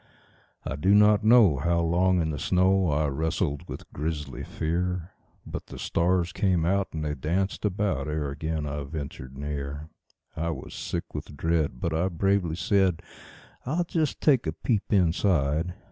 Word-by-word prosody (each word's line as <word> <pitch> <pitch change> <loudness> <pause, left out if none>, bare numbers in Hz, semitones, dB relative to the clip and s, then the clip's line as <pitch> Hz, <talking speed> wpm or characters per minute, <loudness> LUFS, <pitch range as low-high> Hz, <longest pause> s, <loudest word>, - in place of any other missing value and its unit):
I 70 - -3
do 95 +7 +4
not 105 0 +5
know 110 - +6
how 85 +3 +1
long 90 +2 +2
in 80 - -1
the 75 - -4
snow 95 +3 +3
I 75 +1 +1
wrestled 75 +1 -1
with - - -7
grisly 75 -3 -4
fear; 90 +2 -2 0.3
But - - -6
the - - -9
stars 90 +1 +1
came 90 -5 +1
out 95 +2 +1
and 80 -1 -4
they 75 - -1
danced 90 +10 -1
about 95 -8 0
ere 75 -2 -2
again 80 +2 -3
I 75 0 -3
ventured 70 -3 -7
near; 70 +1 -5 0.5
I 85 +2 -2
was 70 -5 -6
sick - - -4
with 75 - -7
dread, 80 -5 0
but 85 - -1
I 85 +4 +1
bravely 95 -1 +1
said: 95 +1 +1 0.6
"I'll 160 +7 0
just 160 -4 -1
take 135 - +3
a 80 - -1
peep 105 +3 -1
inside. 85 -3 +2
85 Hz, 160 wpm, -27 LUFS, 75-95 Hz, 0.6 s, know